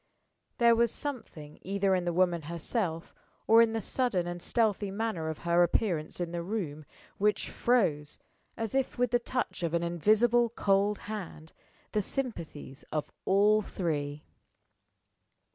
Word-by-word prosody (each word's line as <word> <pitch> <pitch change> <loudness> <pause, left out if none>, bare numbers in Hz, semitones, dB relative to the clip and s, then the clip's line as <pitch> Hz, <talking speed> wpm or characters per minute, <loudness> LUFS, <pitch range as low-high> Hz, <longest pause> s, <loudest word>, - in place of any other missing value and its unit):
There 235 -1 +5
was 235 0 +3
something 205 - -6
either 195 0 0
in 180 -1 0
the 175 - +1
woman 175 -1 +2
herself, 170 0 -2 0.3
or 225 +1 +7
in 225 -1 +3
the 225 - 0
sudden 215 -4 0
and 175 0 -5
stealthy 210 -3 +1
manner 195 -6 -2
of 160 - -4
her 170 +1 +4
appearance 175 -3 0
in 175 -1 -2
the 170 0 -3
room, 170 -6 -4 0.3
which 210 +1 +1
froze, 160 -12 +1 0.4
as 225 -2 -3
if 270 -1 0
with 245 -1 +1
the 245 - +3
touch 245 -4 -3
of 170 -1 -1
an 170 - 0
invisible 220 +8 +3
cold 200 -2 +1
hand, 180 -7 -7 0.4
the 210 - +1
sympathies 170 - -5
of 155 -1 -2
all 205 +2 +4
three. 150 -7 -3
195 Hz, 145 wpm, -30 LUFS, 170-225 Hz, 0.4 s, or